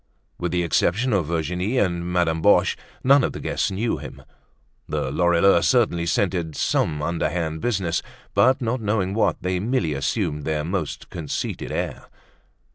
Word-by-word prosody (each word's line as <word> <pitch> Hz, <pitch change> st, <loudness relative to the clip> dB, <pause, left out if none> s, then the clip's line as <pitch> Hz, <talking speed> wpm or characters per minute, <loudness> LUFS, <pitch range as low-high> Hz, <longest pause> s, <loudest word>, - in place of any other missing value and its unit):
With 85 Hz, -1 st, -2 dB
the 90 Hz, 0 st, +1 dB
exception 105 Hz, +8 st, +1 dB
of 90 Hz, -7 st, +1 dB
Virginie 90 Hz, +7 st, -1 dB
and 85 Hz, -4 st, 0 dB
Madame 85 Hz, -2 st, +1 dB
Boche 95 Hz, -2 st, +4 dB, 0.3 s
none 135 Hz, +1 st, +5 dB
of -, -, -1 dB
the -, -, -6 dB
guests -, -, -1 dB
knew 110 Hz, +4 st, -1 dB
him. -, -, -10 dB, 0.7 s
The 65 Hz, -, -2 dB
Lorilleuxs 85 Hz, +2 st, +4 dB
certainly 95 Hz, -9 st, +2 dB
scented 85 Hz, -5 st, 0 dB
some 75 Hz, +1 st, 0 dB
underhand 80 Hz, -1 st, -1 dB
business, 95 Hz, -8 st, 0 dB, 0.3 s
but 130 Hz, +1 st, +3 dB
not 120 Hz, +2 st, -1 dB
knowing 100 Hz, -3 st, 0 dB
what, 110 Hz, -, +1 dB
they 90 Hz, 0 st, 0 dB
merely 105 Hz, -, 0 dB
assumed 70 Hz, +2 st, -1 dB
their 75 Hz, -1 st, -1 dB
most 85 Hz, -2 st, -4 dB
conceited 80 Hz, -4 st, -4 dB
air. -, -, -4 dB
90 Hz, 150 wpm, -23 LUFS, 80-105 Hz, 0.7 s, none